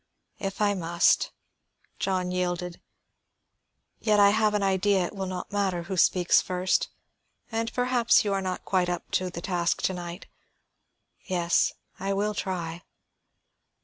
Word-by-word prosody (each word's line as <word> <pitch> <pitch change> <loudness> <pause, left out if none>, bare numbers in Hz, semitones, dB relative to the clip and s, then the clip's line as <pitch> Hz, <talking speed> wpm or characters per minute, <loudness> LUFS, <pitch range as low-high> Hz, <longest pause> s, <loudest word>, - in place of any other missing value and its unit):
"If 195 +1 -4
I 205 -1 +3
must," 170 -2 +2 0.7
John 185 -2 -1
yielded. 180 -1 -2 1.2
"Yet 210 -2 +2
I 200 0 +7
have 215 0 +2
an 205 - +1
idea 195 -1 +2
it - - -6
will 190 -1 -3
not 185 -1 -5
matter 190 -4 0
who 190 +2 -4
speaks 180 0 +4
first, 185 0 0 0.6
and 225 +1 -1
perhaps 245 -3 +3
you 200 - +1
are 195 - 0
not 185 -1 -4
quite 185 -2 +1
up 175 -1 -4
to 185 0 0
the 170 -1 -7
task 175 -1 -1
to 190 - +1
night. 175 +1 -7 1.0
Yes, 175 -2 +2 0.3
I 195 +1 -1
will 205 +2 0
try." 175 -4 -4
185 Hz, 145 wpm, -27 LUFS, 180-200 Hz, 1.2 s, I